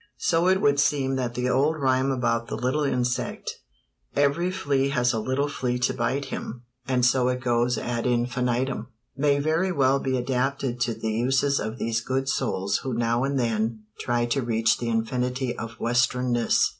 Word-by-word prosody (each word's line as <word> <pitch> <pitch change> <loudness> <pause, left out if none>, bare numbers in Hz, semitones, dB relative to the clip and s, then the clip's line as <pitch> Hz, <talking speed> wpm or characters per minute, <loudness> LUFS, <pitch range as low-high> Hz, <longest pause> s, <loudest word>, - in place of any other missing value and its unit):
_" - - -29
So 170 0 +2
it 190 +1 +4
would 140 -4 +3
seem 135 -2 +2
that 120 -2 -2
the 125 +1 -1
old 140 +5 +2
rime 130 -1 +2
about 120 -3 0
the - - -4
little 130 +5 0
insect 125 -3 -2 0.6
Every 145 +5 +2
flea 140 -7 0
has 125 -3 +1
a 110 - 0
little 130 +5 0
flea 125 -3 -2
to 125 0 +1
bite 130 +3 -1
him, 120 +1 -6 0.2
And 125 -2 +2
so 125 0 +3
it 125 0 0
goes 120 -1 +1
ad 120 0 -2
infinitem 125 0 0 0.3
may 140 +1 +2
very 160 +6 +1
well 135 -4 +3
be 130 -1 -1
adapted 125 0 -1
to 120 -2 0
the 110 - -3
uses 135 +5 +1
of 110 +2 -4
those 115 -1 -1
good 130 +2 -2
souls 100 -6 0
who 130 -3 -4
now 120 +1 +1
and 140 0 0
then 115 -2 -1 0.2
try 120 0 0
to 125 +3 0
reach 115 -2 +1
the 120 - -2
infinity 125 +2 -1
of 115 0 -7
westernness. 120 0 +2
125 Hz, 180 wpm, -25 LUFS, 120-135 Hz, 0.6 s, it